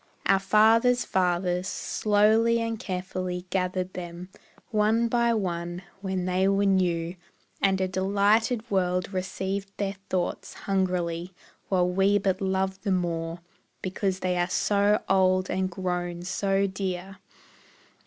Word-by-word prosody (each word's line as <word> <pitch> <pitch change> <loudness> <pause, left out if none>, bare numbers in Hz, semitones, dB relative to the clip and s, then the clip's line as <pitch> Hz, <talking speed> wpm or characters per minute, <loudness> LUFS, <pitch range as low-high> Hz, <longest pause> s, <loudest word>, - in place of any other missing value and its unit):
Our 195 - +4
fathers' 225 +5 +4
fathers, 180 0 0
slowly 220 +4 +2
and 230 -1 -2
carefully 185 -1 -4
Gathered 185 0 -1
them, 175 0 -7 0.4
one 220 +2 +2
by 235 0 +2
one, 175 -3 -3 0.2
when 190 -2 -2
they 185 +1 +2
were 195 +1 +2
new 175 -3 +1 0.5
And 195 -1 +3
a 190 - +1
delighted 205 +5 +1
world 180 0 0
received 190 +1 -3
their 200 -1 -2
thoughts 180 -2 -2
Hungrily; 180 -2 -1 0.3
while 180 -2 +2
we 195 +3 +3
but 190 -2 0
love 190 0 -1
the 205 - -3
more, 170 -2 -1 0.4
Because 190 0 -2
they 180 -1 0
are 175 +1 +1
so 200 +2 +2
old 185 -1 +3
and 185 0 0
grown 175 -1 -3
so 195 +1 0
dear! 190 0 -4
190 Hz, 125 wpm, -26 LUFS, 180-200 Hz, 0.5 s, Our